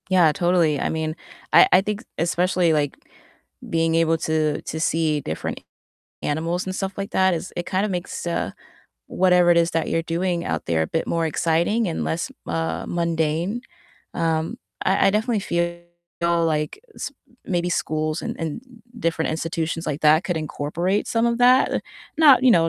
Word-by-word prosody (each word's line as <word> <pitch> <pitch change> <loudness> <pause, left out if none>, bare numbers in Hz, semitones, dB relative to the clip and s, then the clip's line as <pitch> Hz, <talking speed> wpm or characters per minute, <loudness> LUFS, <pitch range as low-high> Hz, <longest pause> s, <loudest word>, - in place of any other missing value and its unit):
Yeah, 180 -4 +5
totally, 175 -4 +2
I - - -1
mean, 160 0 -2 0.4
I - - +8
I 185 - +6
think 210 +3 -4
especially, 175 0 +2
like, 145 -2 0 0.7
being 165 0 +1
able 165 0 +3
to 155 -2 0
to 160 - -5
see 160 -2 +1
different 80 - -4
a - - -29 0.6
animals 165 +4 -1
and 185 0 -4
stuff 195 0 -3
like 195 0 -4
that 190 -1 +3
is 170 +2 -5
it 175 - -2
kind 190 +2 0
of 210 - -2
makes, 175 -1 -4
uh, 170 0 -1 0.6
whatever 180 -1 +4
it 170 - +5
is 170 0 +2
that 165 -1 0
you're 165 - +1
doing 170 +1 -1
out - - -3
there 80 -1 +1
a - - -1
bit 160 - -1
more 165 -1 0
exciting 170 +8 +1
and 165 - -2
less, 170 +10 -2 0.2
uh, 165 0 -2
mundane, 170 +5 -1 0.5
um, 165 -1 -1 0.3
I 190 +1 +3
I - - +4
definitely 215 +2 0
feel 170 -2 -1 0.7
like 150 -1 -1
s - - -5 0.4
maybe 175 -1 0
schools 155 -1 -1
and - - -4
and 160 +4 -3 0.4
different 165 -4 0
institutions 165 +1 -3
like 150 -1 -3
that 155 +3 +5
could 175 - -1
incorporate 160 +6 -2
some 230 0 +2
of 235 0 0
that. 250 +2 +4 0.4
Not 285 -5 +7
you 255 - +7
know, 165 -3 +4
170 Hz, 175 wpm, -23 LUFS, 160-185 Hz, 0.7 s, I